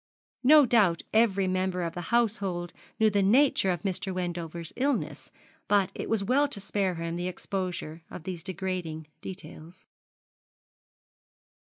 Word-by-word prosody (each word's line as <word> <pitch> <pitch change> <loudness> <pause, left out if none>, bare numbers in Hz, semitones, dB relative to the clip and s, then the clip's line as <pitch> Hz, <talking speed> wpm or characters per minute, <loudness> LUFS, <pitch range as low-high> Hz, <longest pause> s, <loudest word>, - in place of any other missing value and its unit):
No 295 +2 +8
doubt 205 -9 +3
every 200 -4 +3
member 185 -1 0
of 170 - -3
the 175 - -5
household 200 -7 0 0.3
knew 220 -1 +4
the 200 0 +2
nature 225 0 +4
of 175 -3 -1
Mr. 190 0 -2
Wendover's 170 -2 -4
illness; 275 +1 -1 0.4
but 200 -3 +3
it - - -5
was 220 -3 +1
well 275 +8 +3
to 265 - -7
spare 195 -2 -1
him 165 0 -3
the 175 +1 -2
exposure 180 -3 -4
of 160 - -8
these 180 -2 -5
degrading 180 -3 -4 0.2
details. 180 -2 -9
185 Hz, 135 wpm, -28 LUFS, 175-210 Hz, 0.4 s, No